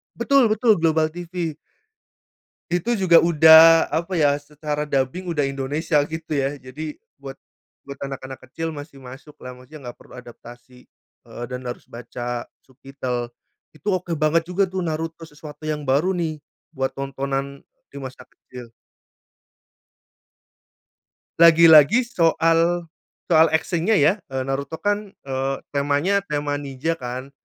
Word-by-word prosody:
betul 255 +1 +3
betul, 215 -3 +2
Global 160 -1 +2
TV. 170 -2 -5 1.1
Itu 180 +8 0
juga 185 -5 +5
udah, 160 0 +7
apa 170 +5 -2
ya, 145 -3 +2
secara 150 0 -5
dubbing 140 +6 -2
udah 160 -4 -1
Indonesia 140 +3 -1
gitu 160 0 -8
ya, 135 +1 -1
jadi 145 +3 -8 0.2
buat 135 -1 -9 0.5
buat 140 0 -10
anak-anak 130 -1 -8
kecil 165 +5 -5
masih 145 -2 -10
masuklah, 130 +1 -11
maksudnya 130 0 -11
gak - - -16
perlu - - -17
adaptasi, 120 +1 -14 0.4
eee, 120 - -8
dan 125 0 -6
harus 120 - -8
baca 120 0 -6 0.2
subtitle. 130 -2 -6 0.5
Itu 205 +6 -4
oke 180 -2 -2
banget 160 +2 +1
juga 185 +1 0
tuh, 185 -2 -3
Naruto 165 +1 -4
sesuatu 150 0 -12
yang 150 -1 -3
baru 145 +8 +1
nih 160 -3 -3 0.3
buat 135 -4 -3
tontonan 140 0 -4 0.2
di 140 - -9
masa 130 -1 -9
kecil. 125 -2 -14 2.7
Lagi-lagi 165 - +7
soal 165 -4 +1 0.4
soal 160 0 +6
action-nya 170 +5 +1
ya, 155 0 +4
eee, 135 -1 -4
Naruto 135 +4 -4
kan, 205 0 -1
eee, 135 0 -2
temanya 145 +7 +1
tema 145 -1 -2
ninja 145 +4 -4
kan, 125 +2 -6
150 Hz, 130 wpm, -22 LUFS, 135-165 Hz, 2.7 s, udah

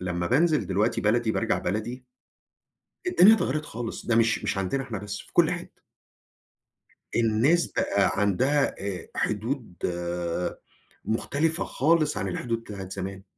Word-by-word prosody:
لما 90 -1 -2
بانزل 155 - +3
دلوقتي 100 +2 +1
بلدي 110 +1 +2
بارجع - - 0
بلدي، 110 +7 -3 1.0
الدنيا 215 - +7
اتغيرت 155 -6 -1
خالص 120 -4 -6
ده 120 - +2
مش 115 0 +2
مش - - -1
عندنا 95 +8 -1
إحنا 120 -5 -5
بس 105 0 -5
في - - -13
كل - - +4
حتة. - - -7 1.4
الناس 120 +9 +3
بقى 100 -1 +2
عندها 130 +9 +2
آآ 100 -2 -5
حدود 110 -1 -2 1.3
مختلفة 150 +8 0
خالص 155 +2 +2
عن 95 - -2
الحدود 115 +5 -2
بتاعة 100 -4 -8
زمان. 95 0 -6
115 Hz, 130 wpm, -26 LUFS, 100-140 Hz, 1.4 s, الدنيا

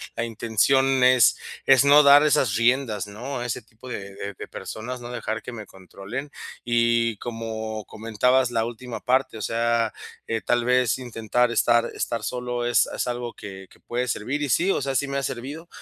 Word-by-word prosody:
la 115 - -2
intención 125 +4 +2
es 125 -1 +5 0.3
es 135 0 +6
no 145 +1 +8
dar 145 +1 +8
esas 130 -7 +2
riendas, 115 -3 +1
¿no? 125 +6 -6
A 120 - -4
ese 120 - -3
tipo 115 +3 -15
de 100 -4 -7
de 100 0 -6
de - - -8
personas, 125 +3 -7
no 120 0 -8
dejar 110 -2 -4
que - - -7
me 110 -3 -8
controlen. 100 +9 -8 0.3
Y, 115 -1 +2
como 110 -2 -5
comentabas 120 +4 +1
la 115 -2 +1
última 120 +1 -7
parte, 130 -3 +1
o - - -7
sea, 115 -1 0 0.4
eh, 115 - -1
tal 120 0 +1
vez, 125 -1 +2
intentar 120 -1 0
estar 120 0 +3
estar 115 -2 -3
solo 125 +1 -3
es 120 -1 +3
es - - -3
algo 120 -1 -4
que 95 -1 -10
que - - -22
puede 125 +1 -3
servir 130 +7 -2
y - - -1
sí, 190 +8 +2
o - - 0
sea, 135 0 -2
sí 140 +2 +1
me 140 - -2
ha 140 - -2
servido. 140 +8 -5
120 Hz, 195 wpm, -24 LUFS, 110-130 Hz, 0.4 s, no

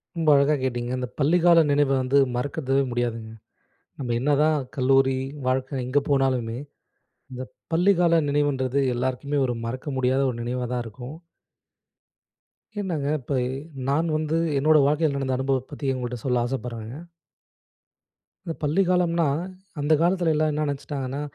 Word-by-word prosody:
ரொம்ப 165 -2 +1
அழகா 140 +2 +4
கேட்டீங்க. 120 -1 -2
அந்த 125 -1 -3
பள்ளிக்கால 170 +3 +5
நினைவ 145 -1 +3
வந்து 130 +2 +2 0.2
மறக்கது 135 +1 -2 0.2
முடியாதுங்க. 115 -2 -3 0.7
நம்ம 125 -3 -2
என்னதான் 150 +3 +2 0.2
கல்லூரி 135 0 +3 0.3
வாழ்க்க 130 0 -1
எங்க 130 +3 +2
போனாலுமே, 130 -4 +1 0.7
அந்த 130 0 -5 0.3
பள்ளிக்கால 175 -1 +4
நினைவுன்றது 140 -2 +1 0.2
எல்லாருக்குமே 130 +3 -2
ஒரு 120 -1 -2
மறக்க 130 +5 -5
முடியாத 130 +1 +2 0.2
நினைவா 125 +1 -2
தான் 125 -1 -1
இருக்கும். 125 +6 -9 1.6
என்னங்க 165 -8 -2
இப்பை, 130 0 -1 0.5
நான் 155 +4 +1
வந்து 155 +1 0 0.2
என்னோட 155 +3 +4
வாழ்க்கைல 150 -1 +1
நடந்த 130 -2 -1
அனுபவத்த 130 0 -1
பத்தி 140 -2 -2
உங்கள்ட்ட 125 -1 -4
சொல்ல 125 -2 +1
ஆசைப்படுறேன்ங்க. 120 -1 -5 1.5
இந்த 165 - -3
பள்ளிக்காலம்னா, 170 0 +2 0.5
அந்த 145 +2 +2
காலத்துல 175 -1 +2
எல்லா 155 +1 +2
என்ன 150 +1 -1
நெனச்சிட்டாங்கன்னா? 140 -1 -4
135 Hz, 125 wpm, -24 LUFS, 125-155 Hz, 1.6 s, பள்ளிக்கால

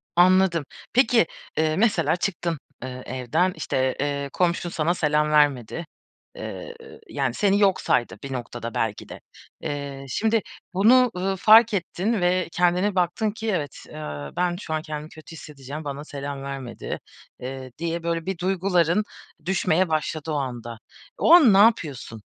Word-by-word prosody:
Anladım. 180 -2 +4 0.3
Peki, 240 -5 +4 0.3
ııı, 155 0 +1
mesela 220 -2 +2
çıktın, 175 -3 -2 0.2
eee, 130 0 -6
evden, 130 +9 0
işte, 130 0 -1
eee, 140 0 -2
komşun 175 -1 0
sana 170 +1 0
selam 150 -2 +1
vermedi. 145 +1 +2 0.5
Eee, 485 -1 -7 0.3
yani, - - -1
seni 200 -1 +2
yok 195 -2 +3
saydı 120 - +1
bir 135 - -5
noktada 120 -2 -5
belki 110 -2 -2
de. - - -9 0.4
Eee, 140 -1 -5
şimdi 220 - +1 0.3
bunu, 245 +6 +5
ııı, 190 +1 -1
fark 220 +3 +6
ettin 195 +3 -1
ve 180 0 +2
kendine 180 +4 +2
baktın 185 +4 +1
ki 220 +1 -4
evet, 150 -7 -3
eee, 75 - -6
"Ben 175 -1 +1
şu 165 -4 -5
an 155 - -1
kendimi 155 -1 -6
kötü 155 +1 -14
hissedeceğim, 145 0 -8
bana 145 0 -5
selam 140 -1 -6
vermedi." 135 -3 -6 0.4
eee, 130 0 -7
diye 170 +1 -3
böyle 165 -1 -2
bir 190 -2 -3
duyguların 185 0 +1 0.4
düşmeye 185 -1 +1
başladı 155 0 -2
o - - -1
anda. 120 -4 -4 0.4
O 325 - +5
an 295 - +8
ne - - +5
yapıyorsun? 155 - +2
165 Hz, 150 wpm, -24 LUFS, 140-190 Hz, 0.5 s, an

